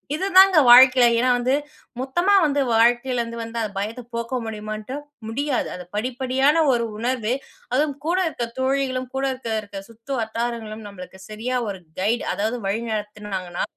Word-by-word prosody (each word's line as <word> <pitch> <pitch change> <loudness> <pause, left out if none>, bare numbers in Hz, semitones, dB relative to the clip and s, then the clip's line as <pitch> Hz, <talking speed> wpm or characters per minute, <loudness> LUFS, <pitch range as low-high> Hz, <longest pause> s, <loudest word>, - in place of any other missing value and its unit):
இது 370 - -2
தான் 385 +1 +9 0.2
வாழ்க்கையில 255 +1 +8
ஏன்னா, 255 +2 +2
வந்து 250 +2 0 0.5
மொத்தமா 345 +10 +1
வந்து 290 -2 +1
வாழ்க்கையிலருந்து 235 +1 +2
வந்து 230 +1 -6
அந்த 215 -2 -3
பயத்த 215 +5 -3
போக்க 235 +2 -3
முடியுமான்ட்டு 215 +2 -6 0.3
முடியாது. 270 +4 -1
அது 180 - -8
படிப்படியான 260 +6 +1
ஒரு 235 -1 +1
உணர்வு, 235 0 -1 0.4
அதுவும் 285 +2 +1
கூட 345 +3 +1
இருக்கிற 240 -7 -3
தோழிகளும் 260 -1 -1
கூட 270 0 0
இருக்க, 255 -3 -7
இருக்க 200 -1 -8
சுற்று 230 +4 -12
வட்டாரங்களும் 225 -1 -4
நம்மளுக்கு 190 -1 -11
சரியா 225 +4 -3
ஒரு 195 -2 -5 0.2
கைடு, 220 +5 0
அதாவது 220 +4 -2
வழி 200 +4 -1
நடத்துனாங்கனா, 210 -4 -4
235 Hz, 150 wpm, -22 LUFS, 215-260 Hz, 0.5 s, தான்